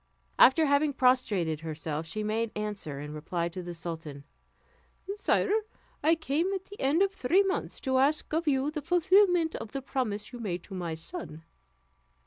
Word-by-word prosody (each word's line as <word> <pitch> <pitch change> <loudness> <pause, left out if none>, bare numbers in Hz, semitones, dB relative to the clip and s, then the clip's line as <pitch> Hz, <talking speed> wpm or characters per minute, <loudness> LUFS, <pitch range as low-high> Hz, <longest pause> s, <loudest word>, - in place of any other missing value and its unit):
After 310 +5 +7
having 285 +1 +3
prostrated 215 - +2
herself, 160 0 -4
she 215 +6 -3
made 220 +2 0
answer, 205 -9 -4
in 150 +1 -6
reply 170 +3 -2
to 180 +2 -6
the 175 -1 -7
sultan: 160 -4 -6 0.9
"Sire, 410 -1 +1 0.5
I 320 +3 +4
come 320 +4 -1
at 380 0 -5
the 410 - -11
end 295 +8 +3
of 395 - +1
three 370 +6 +3
months 385 -1 -2
to 260 -1 +1
ask 295 +3 +1
of 325 +1 0
you 275 0 +2
the 305 -1 -4
fulfillment 355 +1 +4
of 210 - -8
the 275 - -3
promise 220 -5 -3
you 245 - -7
made 180 -6 -3
to 195 - -10
my 175 -3 -3
son." 160 - -7
250 Hz, 170 wpm, -29 LUFS, -, 0.9 s, After